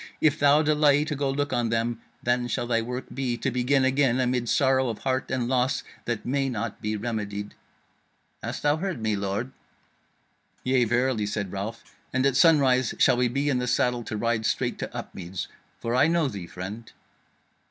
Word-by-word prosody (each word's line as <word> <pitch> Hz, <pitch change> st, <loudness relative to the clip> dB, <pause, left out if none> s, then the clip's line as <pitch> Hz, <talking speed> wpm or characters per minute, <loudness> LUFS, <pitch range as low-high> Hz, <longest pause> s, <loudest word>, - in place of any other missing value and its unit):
If 155 Hz, 0 st, +3 dB
thou 145 Hz, +2 st, +5 dB
delay 150 Hz, -1 st, +4 dB
to 155 Hz, -2 st, -3 dB
go 140 Hz, 0 st, -1 dB
look 145 Hz, 0 st, -1 dB
on 120 Hz, -2 st, +1 dB
them, 115 Hz, 0 st, -1 dB, 0.2 s
then 120 Hz, 0 st, +1 dB
shall 120 Hz, -, -1 dB
thy 115 Hz, -1 st, +1 dB
work 125 Hz, +3 st, -5 dB
be 125 Hz, -3 st, -1 dB
to 135 Hz, -, -1 dB
begin 130 Hz, +2 st, +2 dB
again 130 Hz, -2 st, +2 dB
amid 125 Hz, -2 st, 0 dB
sorrow 130 Hz, -2 st, +3 dB
of 115 Hz, -, -3 dB
heart 130 Hz, 0 st, -1 dB
and 125 Hz, -2 st, -1 dB
loss 130 Hz, +1 st, +1 dB, 0.2 s
that 120 Hz, -3 st, -3 dB
may 135 Hz, +1 st, 0 dB
not 110 Hz, -5 st, -4 dB
be 105 Hz, 0 st, -2 dB
remedied.' 105 Hz, -2 st, -4 dB, 0.9 s
Hast -, -, -5 dB
thou 145 Hz, +1 st, +3 dB
heard 185 Hz, -4 st, -3 dB
me, 110 Hz, -1 st, 0 dB
lord?" 100 Hz, +6 st, -2 dB, 1.1 s
"Yea, 130 Hz, -1 st, +3 dB
verily," 120 Hz, -2 st, +1 dB
said 100 Hz, -3 st, -3 dB
Ralph, 105 Hz, +4 st, -5 dB, 0.3 s
"and 130 Hz, +1 st, +1 dB
at 135 Hz, -2 st, +3 dB
sunrise 130 Hz, -5 st, +4 dB
shall -, -, +4 dB
we 125 Hz, 0 st, +3 dB
be 140 Hz, +4 st, -1 dB
in 130 Hz, -3 st, +2 dB
the 125 Hz, -, -2 dB
saddle 125 Hz, 0 st, +1 dB
to 110 Hz, -, -4 dB
ride 115 Hz, 0 st, 0 dB
straight -, -, -1 dB
to -, -, -4 dB
Upmeads. 90 Hz, 0 st, -6 dB, 0.3 s
For 115 Hz, -, -2 dB
I 130 Hz, +4 st, +5 dB
know 165 Hz, -2 st, +2 dB
thee, 100 Hz, -8 st, -6 dB
friend." 100 Hz, +7 st, -7 dB
125 Hz, 185 wpm, -26 LUFS, 115-135 Hz, 1.1 s, thou